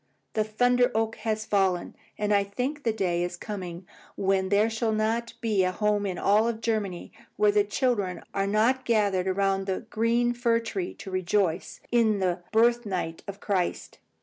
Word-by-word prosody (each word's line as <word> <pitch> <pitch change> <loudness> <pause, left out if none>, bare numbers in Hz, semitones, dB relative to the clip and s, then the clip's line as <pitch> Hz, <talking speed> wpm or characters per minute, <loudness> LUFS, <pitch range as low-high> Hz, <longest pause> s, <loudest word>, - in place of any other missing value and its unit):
The 215 - +2
thunder 245 +3 +2
oak 225 0 0
has 215 -1 -2
fallen, 190 -4 0 0.2
and 210 0 0
I 200 -1 +4
think 250 +9 -3
the 230 - +1
day 180 -5 0
is 175 0 -4
coming 180 -3 -6 0.3
when 190 -1 +1
there 205 +2 +4
shall 225 0 -1
not 225 +2 -1
be 215 -4 +2
a 185 - +1
home 210 +1 0
in 185 -2 -3
all 215 +3 +3
Germany 220 -5 -3 0.3
where 420 0 +4
the 415 0 +3
children 220 - -1
are 195 0 0
not 225 +6 +2
gathered 205 -6 +1
around 195 0 0
the 190 - -1
green 235 +2 +2
fir 235 -1 +2
tree 360 +10 -4
to 195 - -9
rejoice 185 -1 -1
in 225 -3 +3
the 180 -2 -1
birth 235 +2 +4
night 180 -6 -3
of 200 0 -7
Christ." 190 -4 -2
210 Hz, 175 wpm, -27 LUFS, 190-230 Hz, 0.3 s, I